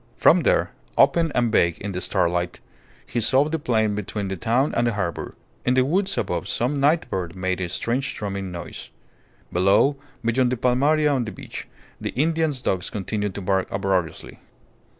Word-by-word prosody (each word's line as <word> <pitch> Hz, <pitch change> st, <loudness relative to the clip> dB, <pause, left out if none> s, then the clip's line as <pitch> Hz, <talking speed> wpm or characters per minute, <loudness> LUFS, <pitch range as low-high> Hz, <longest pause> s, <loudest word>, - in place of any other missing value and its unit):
From -, -, +6 dB
there, -, -, +2 dB, 0.3 s
open 165 Hz, -2 st, +4 dB
and 120 Hz, -2 st, +2 dB
vague 85 Hz, -6 st, +3 dB
in 100 Hz, -, -4 dB
the 90 Hz, -1 st, -3 dB
starlight, 85 Hz, 0 st, 0 dB, 0.5 s
he 120 Hz, -, -2 dB
saw 130 Hz, +5 st, +4 dB
the 160 Hz, +1 st, -2 dB
plain 110 Hz, -6 st, +1 dB
between 100 Hz, -1 st, -3 dB
the 95 Hz, -, -2 dB
town 120 Hz, -, +1 dB
and 120 Hz, 0 st, +2 dB
the 120 Hz, -, +1 dB
harbour. 95 Hz, -5 st, -3 dB, 0.3 s
In 125 Hz, -, +2 dB
the 130 Hz, 0 st, +4 dB
woods 190 Hz, +7 st, +1 dB
above 85 Hz, -2 st, -1 dB
some 135 Hz, +4 st, 0 dB
night 150 Hz, +4 st, +3 dB
bird 90 Hz, -2 st, -3 dB
made 95 Hz, 0 st, -2 dB
a 90 Hz, -, -2 dB
strange 125 Hz, +9 st, -2 dB
drumming 100 Hz, -2 st, -4 dB
noise. 85 Hz, -1 st, -7 dB, 0.6 s
Below 100 Hz, +10 st, +4 dB, 0.3 s
beyond 125 Hz, +2 st, +2 dB
the 125 Hz, -, 0 dB
palmaria 145 Hz, +5 st, +3 dB
on 130 Hz, -4 st, 0 dB
the 105 Hz, -, -5 dB
beach, -, -, -8 dB, 0.3 s
the -, -, -2 dB
Indian's 155 Hz, -1 st, +1 dB
dogs 95 Hz, -1 st, -1 dB
continued 105 Hz, 0 st, -3 dB
to 100 Hz, -, -4 dB
bark 95 Hz, 0 st, 0 dB
uproariously. 95 Hz, -5 st, -2 dB
110 Hz, 175 wpm, -23 LUFS, 95-135 Hz, 0.6 s, From